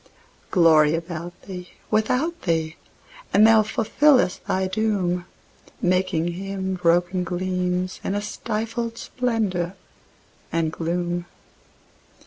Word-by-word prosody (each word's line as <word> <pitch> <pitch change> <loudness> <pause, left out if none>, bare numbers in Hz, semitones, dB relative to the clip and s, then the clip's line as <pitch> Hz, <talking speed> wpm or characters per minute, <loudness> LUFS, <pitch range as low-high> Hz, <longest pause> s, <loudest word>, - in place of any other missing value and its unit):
Glory 160 -4 +5
about 170 +1 -6
thee, 180 -2 -8 0.2
without 255 +10 +1
thee; 160 -2 -1 0.6
and 210 - +7
thou 220 0 +7
fulfillest 230 +1 +2
thy 190 0 +1
doom, 185 -4 0 0.5
Making 180 -2 +1
Him 190 +1 -4
broken 180 +1 +2
gleams, 180 0 -2
and 195 - -1
a 205 - 0
stifled 225 +2 -3
splendour 210 -10 -1 0.8
and 165 -1 0
gloom. 175 +1 -2
185 Hz, 100 wpm, -23 LUFS, 175-215 Hz, 0.8 s, and